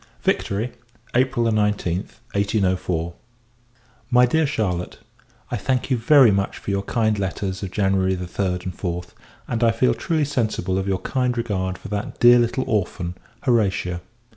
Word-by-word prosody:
Victory, 110 Hz, +5 st, 0 dB, 0.4 s
April 125 Hz, -1 st, +2 dB
19th, 105 Hz, -5 st, 0 dB, 0.2 s
1804. 95 Hz, -4 st, 0 dB, 1.0 s
MY 125 Hz, 0 st, +6 dB
DEAR 160 Hz, +5 st, +2 dB
CHARLOTTE, 95 Hz, -, -2 dB, 0.5 s
I 120 Hz, -, 0 dB
thank 130 Hz, 0 st, -1 dB
you 130 Hz, -, +3 dB
very 125 Hz, 0 st, +6 dB
much 100 Hz, 0 st, -1 dB
for -, -, -4 dB
your 100 Hz, 0 st, 0 dB
kind 110 Hz, 0 st, 0 dB
letters 95 Hz, -1 st, -3 dB
of 95 Hz, -, -4 dB
January 95 Hz, -1 st, +1 dB
3d, 90 Hz, 0 st, -2 dB
and 90 Hz, -, -5 dB
4th; 90 Hz, -1 st, -4 dB, 0.4 s
and 120 Hz, -1 st, -1 dB
I 115 Hz, -, +6 dB
feel 115 Hz, +3 st, +2 dB
truly 160 Hz, -4 st, 0 dB
sensible 110 Hz, -9 st, -1 dB
of 95 Hz, -, -3 dB
your 95 Hz, -1 st, 0 dB
kind 125 Hz, -2 st, 0 dB
regard 95 Hz, -5 st, -2 dB
for -, -, -10 dB
that 105 Hz, 0 st, -4 dB
dear 120 Hz, 0 st, +8 dB
little 120 Hz, +2 st, +1 dB
orphan, 90 Hz, -4 st, -1 dB, 0.3 s
Horatia. 95 Hz, -8 st, +1 dB
105 Hz, 150 wpm, -22 LUFS, 95-120 Hz, 1.0 s, dear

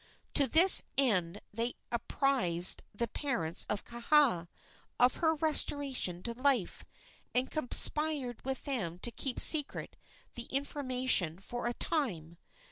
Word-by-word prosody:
To 280 Hz, -, +4 dB
this 340 Hz, +8 st, +8 dB, 0.2 s
end 205 Hz, -9 st, +1 dB
they 230 Hz, +3 st, -1 dB, 0.2 s
apprised 235 Hz, -7 st, +1 dB
the 235 Hz, +3 st, -4 dB
parents 175 Hz, -, -2 dB
of 210 Hz, -, -3 dB
Kaha 235 Hz, -, 0 dB, 0.5 s
of 250 Hz, +1 st, +3 dB
her 320 Hz, -1 st, 0 dB
restoration 285 Hz, -, -1 dB
to 235 Hz, -, -5 dB
life, 255 Hz, -5 st, -1 dB, 0.5 s
and 250 Hz, +1 st, 0 dB
conspired 300 Hz, -2 st, -1 dB
with 265 Hz, 0 st, -5 dB
them 195 Hz, -, -4 dB
to 235 Hz, +6 st, 0 dB
keep 255 Hz, +1 st, -4 dB
secret 300 Hz, -3 st, +2 dB, 0.4 s
the 235 Hz, -, -7 dB
information 255 Hz, -, -2 dB
for 240 Hz, +5 st, -7 dB
a 240 Hz, -, -4 dB
time. 170 Hz, -, -4 dB
250 Hz, 125 wpm, -30 LUFS, 200-280 Hz, 0.5 s, this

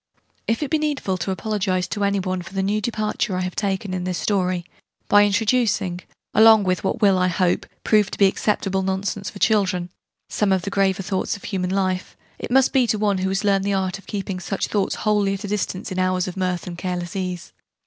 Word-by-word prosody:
If 230 Hz, +6 st, 0 dB
it 290 Hz, -, -4 dB
be 315 Hz, -, +2 dB
needful 290 Hz, -11 st, -1 dB
to 175 Hz, -, -3 dB
apologize 190 Hz, -2 st, -1 dB
to 205 Hz, -, -2 dB
any 200 Hz, 0 st, +2 dB
one 185 Hz, -1 st, -2 dB
for 175 Hz, -, -11 dB
the 190 Hz, -, 0 dB
new 210 Hz, +2 st, 0 dB
departure 215 Hz, -2 st, -1 dB
I 185 Hz, -, -1 dB
have 180 Hz, 0 st, -3 dB
taken 195 Hz, -1 st, -2 dB
in 180 Hz, -1 st, -2 dB
this 180 Hz, -1 st, -2 dB
story 185 Hz, -4 st, 0 dB, 0.4 s
by 205 Hz, 0 st, +6 dB
introducing, 205 Hz, -4 st, +1 dB, 0.3 s
along 220 Hz, -1 st, +7 dB
with 185 Hz, -4 st, 0 dB
what 220 Hz, -, -1 dB
will, 195 Hz, -2 st, +5 dB
I 185 Hz, -, +3 dB
hope, 180 Hz, 0 st, 0 dB, 0.2 s
prove 210 Hz, -2 st, +3 dB
to -, -, -7 dB
be 200 Hz, -, +5 dB
acceptable 195 Hz, -1 st, 0 dB
nonsense 190 Hz, +1 st, -2 dB
for 210 Hz, -, -11 dB
children, 185 Hz, -5 st, +1 dB, 0.4 s
some 210 Hz, -2 st, 0 dB
of 190 Hz, -2 st, +2 dB
the 200 Hz, -, -4 dB
graver 195 Hz, 0 st, +1 dB
thoughts 190 Hz, 0 st, -1 dB
of -, -, -19 dB
human 185 Hz, -3 st, -2 dB
life 185 Hz, -1 st, -1 dB, 0.2 s
it -, -, -5 dB
must 265 Hz, +1 st, +4 dB
be 260 Hz, -3 st, +4 dB
to 220 Hz, -, +1 dB
one 205 Hz, -2 st, +1 dB
who 190 Hz, +1 st, 0 dB
has 195 Hz, +1 st, -1 dB
learned 195 Hz, -1 st, +2 dB
the 200 Hz, 0 st, 0 dB
Art 190 Hz, 0 st, -1 dB
of -, -, -19 dB
keeping 195 Hz, -2 st, -4 dB
such 195 Hz, +1 st, -2 dB
thoughts 200 Hz, -2 st, 0 dB
wholly 205 Hz, -2 st, +2 dB
at 195 Hz, -, -8 dB
a -, -, -4 dB
distance 195 Hz, -2 st, -3 dB
in 185 Hz, -, -2 dB
hours 185 Hz, 0 st, +1 dB
of 185 Hz, -, -5 dB
mirth 185 Hz, -2 st, -2 dB
and 175 Hz, -1 st, -7 dB
careless 180 Hz, +1 st, -4 dB
ease. 180 Hz, -2 st, -4 dB
195 Hz, 225 wpm, -22 LUFS, 185-210 Hz, 0.4 s, along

